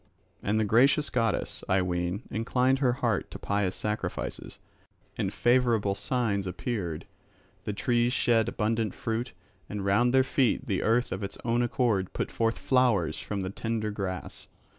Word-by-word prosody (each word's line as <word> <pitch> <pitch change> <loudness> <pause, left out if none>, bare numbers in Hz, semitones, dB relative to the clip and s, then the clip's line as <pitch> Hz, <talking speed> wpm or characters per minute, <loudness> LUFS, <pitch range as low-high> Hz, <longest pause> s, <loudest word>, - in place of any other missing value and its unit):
And 105 +2 +1
the 110 - +2
gracious 135 +8 +4
goddess, 115 -3 -1
I 95 0 +3
ween, 90 +3 -2
inclined 125 +4 +1
her 130 -3 +3
heart 120 -6 -1
to - - -8
pious 100 -2 -1
sacrifices; 105 -4 -4 0.6
and - - -1
favourable 120 -5 +2
signs 105 -4 -1
appeared. 90 -4 -3 0.6
The 105 - -2
trees 120 +3 +1
shed 115 -3 +2
abundant 110 -2 -1
fruit, 115 +2 -3 0.4
and 100 -1 -4
round 115 +5 +3
their 130 0 +5
feet 130 -1 +1
the 100 -7 -1
earth 120 +3 +2
of 95 - -3
its 100 0 -5
own 120 +1 +2
accord 115 -6 0
put - - -3
forth 115 0 0
flowers 115 - +2
from 100 -1 -4
the 95 0 -3
tender 110 0 -2
grass. 95 -3 -5
110 Hz, 155 wpm, -28 LUFS, 100-120 Hz, 0.6 s, their